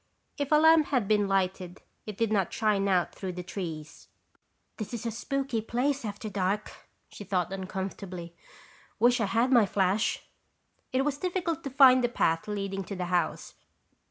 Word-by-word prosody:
If 285 +1 -2
a - - +6
lamp 320 0 +6
had 250 -8 0
been 210 -1 +2
lighted, 185 -2 -1 0.2
it 210 -2 -6
did 230 -2 0
not 195 -4 +1
shine 210 -3 +1
out 180 -3 +1
through 185 -2 -5
the 180 0 -6
trees. 165 -5 -7 0.7
"This 220 +2 -5
is 235 - -6
a 230 - -1
spooky 260 +1 -2
place 260 +5 -1
after 210 0 -5
dark," 200 +1 -3 0.2
she - - -10
thought 185 -1 -1
uncomfortably. 190 -2 -6 0.6
"Wish 240 +2 +3
I - - +2
had 230 +6 +1
my 235 -5 +5
flash." 195 +2 0 0.7
It 265 +1 +1
was 285 -1 -1
difficult 350 -2 -2
to - - -2
find 255 -1 +6
the 240 - +2
path 165 -7 0
leading 195 -2 -3
to 200 - -6
the 180 -1 -3
house. 175 -3 -1
210 Hz, 170 wpm, -28 LUFS, 190-255 Hz, 0.7 s, a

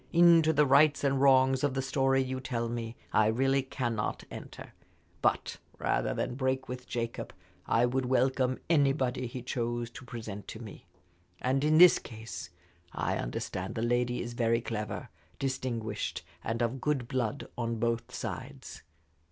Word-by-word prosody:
Into 170 -2 +6
the 150 -1 +4
rights 145 +2 +5
and 135 -1 +2
wrongs 130 -1 +5
of 140 -2 +1
the 135 - +1
story 135 0 +2
you 130 0 -3
tell 120 -2 -2
me, 115 -1 -4 0.2
I 110 -1 +5
really 135 +5 +2
cannot 120 -5 -2
enter; - - -9 0.5
but - - +1 0.2
rather - - 0
than - - -2
break 130 0 -1
with 125 0 -7
Jacob 115 -1 -4 0.4
I 115 +2 +4
would 125 +1 0
welcome 130 0 +2
anybody 135 -5 +2
he 125 0 -7
chose 120 -1 -2
to 130 - -10
present 110 -5 -7
to 110 - -7
me. 110 -3 -10 0.5
And 135 +2 +1
in 155 +1 +4
this 180 +1 +8
case 110 -7 -8 0.4
I - - -1
understand 90 +9 -4
the 115 - -1
lady 120 +1 +1
is 120 0 -6
very 115 -1 +2
clever, 110 -3 -4 0.3
distinguished, 120 -6 -3 0.2
and 115 +2 -1
of 120 +2 -2
good 140 -5 0
blood 130 +1 -2
on 115 -1 -2
both 115 +1 -1
sides. - - -6
125 Hz, 155 wpm, -30 LUFS, 115-135 Hz, 0.5 s, this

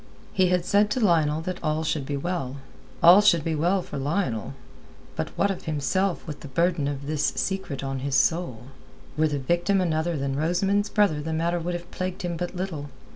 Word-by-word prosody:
He 185 -1 +3
had 180 -1 +1
said 205 +2 +3
to 230 - -1
Lionel 160 -7 +3
that 185 +2 -5
all 155 +1 0
should 150 -3 -2
be 145 - -2
well. 140 -4 -3 0.5
All 175 +4 +9
should 170 -7 +4
be 165 - -1
well 175 +5 +1
for - - -6
Lionel. 135 - -2 0.6
But - - -2
what 200 - +2
of 190 - -6
himself 170 +5 0
with 150 -3 -7
the - - -9
burden 165 +1 +1
of 140 -1 -4
this 150 0 -1
secret 190 -8 -2
on 135 -1 -3
his 135 +1 -2
soul? 135 -4 +1 0.5
Were 155 +1 +3
the 145 -1 -1
victim 175 +8 +1
another 165 -2 0
than 135 -1 -2
Rosamund's 195 +7 +1
brother 200 -9 +2
the 160 +2 -3
matter 170 +2 0
would 175 +1 -3
have 175 0 -8
plagued 185 +1 -4
him 175 -1 -2
but 175 +2 -4
little. 170 -6 -4
165 Hz, 200 wpm, -25 LUFS, 145-185 Hz, 0.6 s, All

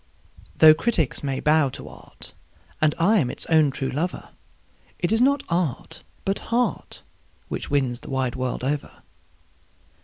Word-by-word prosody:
Though 155 -1 +8
critics 165 - -1
may 135 -2 -2
bow 150 -2 +3
to - - -10
art, - - -12 0.5
and 155 -1 +3
I 200 +6 +3
am 130 -7 0
its - - -4
own 155 -2 +5
true 135 0 -3
lover, 165 +7 -3 0.7
It 175 - -1
is 225 +1 +3
not 280 +2 +3
art, 170 -7 -2 0.2
but 195 0 0
heart, 240 +2 -1 0.5
which - - -5
wins 130 -4 0
the - - -12
wide 130 -3 -1
world 130 -1 -3
over. 140 +2 -4
155 Hz, 150 wpm, -23 LUFS, 135-185 Hz, 0.7 s, Though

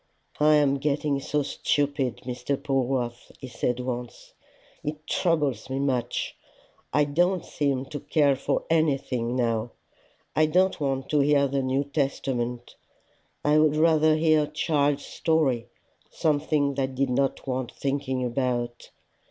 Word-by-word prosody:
"I 150 +1 +5
am 140 -2 +3
getting 145 0 0
so 145 +1 -1
stupid, 140 -2 -1
Mr. 125 +2 -2
Polwarth!" 130 -3 -2
he 130 - -7
said 125 0 -2
once. 125 -1 -6 0.5
"It 150 +1 -5
troubles 150 - 0
me 130 - -2
much. 130 -4 -1 0.6
I 150 - +3
don't 175 +5 +1
seem 135 -3 -1
to 145 +2 -6
care 140 -1 +2
for 130 - -1
anything 135 -7 +1
now. 115 -2 0 0.6
I 155 0 +4
don't 185 +2 +2
want 135 -1 -1
to 150 - +2
hear 140 0 +4
the 140 0 -1
New 130 +1 0
Testament: 130 -4 -2 0.7
I 150 +1 +5
would 155 -1 +3
rather 155 0 +4
hear 155 -1 +3
a - - -11
child's 145 -2 0
story 140 -8 0 0.4
something 145 -2 +1
that 135 -1 -2
did 135 0 0
not 135 +2 0
want 130 -2 -3
thinking 135 -2 -2
about. 120 -1 -2
140 Hz, 135 wpm, -26 LUFS, 130-150 Hz, 0.7 s, I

